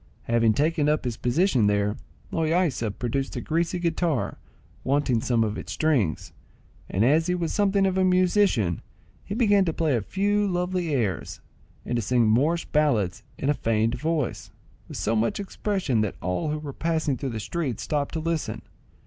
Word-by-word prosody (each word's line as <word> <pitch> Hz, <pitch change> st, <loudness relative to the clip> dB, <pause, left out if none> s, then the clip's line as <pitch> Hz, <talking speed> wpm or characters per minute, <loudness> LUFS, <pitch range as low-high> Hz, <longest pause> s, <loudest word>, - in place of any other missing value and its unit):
Having 115 Hz, -1 st, +3 dB
taken 150 Hz, +1 st, +2 dB
up 150 Hz, -2 st, 0 dB
his 120 Hz, -2 st, -2 dB
position 125 Hz, -, +2 dB
there, 105 Hz, +1 st, +1 dB, 0.4 s
Loaysa 160 Hz, -7 st, +1 dB
produced 135 Hz, +3 st, -2 dB
a -, -, -2 dB
greasy 170 Hz, +3 st, -1 dB
guitar, 170 Hz, -4 st, -1 dB, 0.4 s
wanting 130 Hz, -4 st, +1 dB
some 115 Hz, -1 st, +2 dB
of 110 Hz, -1 st, -2 dB
its -, -, -6 dB
strings, 125 Hz, -, 0 dB, 0.6 s
and 100 Hz, +5 st, +1 dB
as 155 Hz, +6 st, +3 dB
he 180 Hz, -, +1 dB
was 170 Hz, -2 st, -2 dB
something 200 Hz, -1 st, +2 dB
of 190 Hz, 0 st, +1 dB
a -, -, +4 dB
musician, 185 Hz, -, +2 dB, 0.4 s
he 205 Hz, -, -5 dB
began 205 Hz, -4 st, +4 dB
to 165 Hz, -, +1 dB
play 155 Hz, -5 st, +1 dB
a 115 Hz, -, 0 dB
few 205 Hz, -, 0 dB
lovely 180 Hz, -2 st, -1 dB
airs, 110 Hz, -, -1 dB, 0.5 s
and 120 Hz, -, -1 dB
to -, -, 0 dB
sing 120 Hz, +1 st, +2 dB
Moorish 150 Hz, +10 st, +2 dB
ballads 120 Hz, -, +1 dB, 0.2 s
in 135 Hz, -, -3 dB
a 145 Hz, -, +4 dB
feigned 115 Hz, -3 st, 0 dB
voice, 150 Hz, +1 st, -2 dB, 0.4 s
with -, -, -7 dB
so 110 Hz, -, 0 dB
much 115 Hz, -, 0 dB
expression 190 Hz, -, -1 dB
that 105 Hz, -3 st, -2 dB
all 90 Hz, -, -2 dB
who 150 Hz, -, -1 dB
were 150 Hz, -2 st, -7 dB
passing 160 Hz, -3 st, 0 dB
through 135 Hz, +2 st, -4 dB
the 115 Hz, -2 st, -4 dB
street 135 Hz, +1 st, -3 dB
stopped 145 Hz, -2 st, -2 dB
to -, -, 0 dB
listen. 165 Hz, 0 st, -2 dB
150 Hz, 175 wpm, -25 LUFS, 115-170 Hz, 0.6 s, a